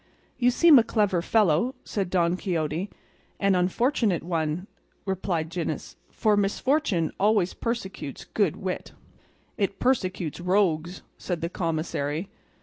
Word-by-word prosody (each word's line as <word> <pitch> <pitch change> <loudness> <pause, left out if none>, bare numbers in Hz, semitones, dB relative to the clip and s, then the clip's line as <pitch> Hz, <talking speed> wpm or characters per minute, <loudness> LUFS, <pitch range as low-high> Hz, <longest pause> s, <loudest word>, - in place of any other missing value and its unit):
"You 245 -1 +4
seem 295 +2 +7
a - - +4
clever 205 -6 +1
fellow," 210 - +2
said 195 -4 -2
Don 175 -1 +2
Quixote. 170 0 -2 0.5
"And 200 -1 +3
an 180 0 +3
unfortunate 225 - +1
one," 165 0 -2 0.4
replied 180 -4 -2
Gines, 175 -1 -4
"for 215 -2 +2
misfortune 205 - +1
always 205 -3 +3
persecutes 195 - -4
good 200 -8 0
wit." 185 -1 -5 0.6
"It 200 -1 -1
persecutes 185 - 0
rogues," 180 -2 +1 0.2
said 175 -3 -3
the 170 - -2
commissary. 160 -1 -2
185 Hz, 125 wpm, -26 LUFS, 170-210 Hz, 0.6 s, seem